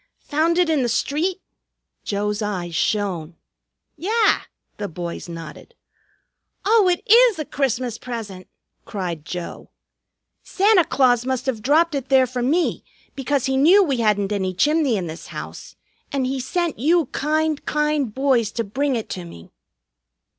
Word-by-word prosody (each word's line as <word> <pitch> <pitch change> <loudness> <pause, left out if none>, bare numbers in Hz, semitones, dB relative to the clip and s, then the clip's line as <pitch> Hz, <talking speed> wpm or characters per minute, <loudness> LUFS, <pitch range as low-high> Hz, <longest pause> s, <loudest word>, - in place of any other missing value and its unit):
"Found 320 +3 +2
it 360 -1 +3
in 310 -3 +2
the 245 - 0
street?" 325 +10 -1 0.6
Joe's 210 +1 -2
eyes 185 -5 -3
shone. 175 -4 -1 0.6
"Yah!" 425 +8 +2 0.3
the 205 - -3
boys 175 0 -6
nodded. 165 - -9 0.9
"Oh, 425 -1 +5
it 350 - -1
is 465 0 +6
a 310 - -3
Christmas 255 -4 -2
present!" 215 -7 -7 0.4
cried 175 -6 -5
Joe. 180 0 -7 0.7
"Santa 390 -3 +3
Claus 255 -3 +3
must 260 0 -2
have 250 -5 -2
dropped 310 +7 +3
it 275 -2 -3
there 265 -1 +5
for 250 0 -4
me, 315 +8 +1 0.3
because 275 0 -1
he 265 - 0
knew 345 +9 +6
we 280 -7 0
hadn't 210 -3 +1
any 190 -3 -1
chimney 295 - +2
in 185 - -3
this 160 0 -8
house, - - -8 0.4
and 275 -2 0
he 265 +1 -2
sent 335 +4 -2
you 325 +5 +3
kind, 310 +1 0
kind 300 -5 0
boys 255 -3 +1
to 230 - -1
bring 265 +6 -1
it 225 - -3
to 180 - -5
me." 85 - -12
260 Hz, 150 wpm, -22 LUFS, 205-310 Hz, 0.9 s, is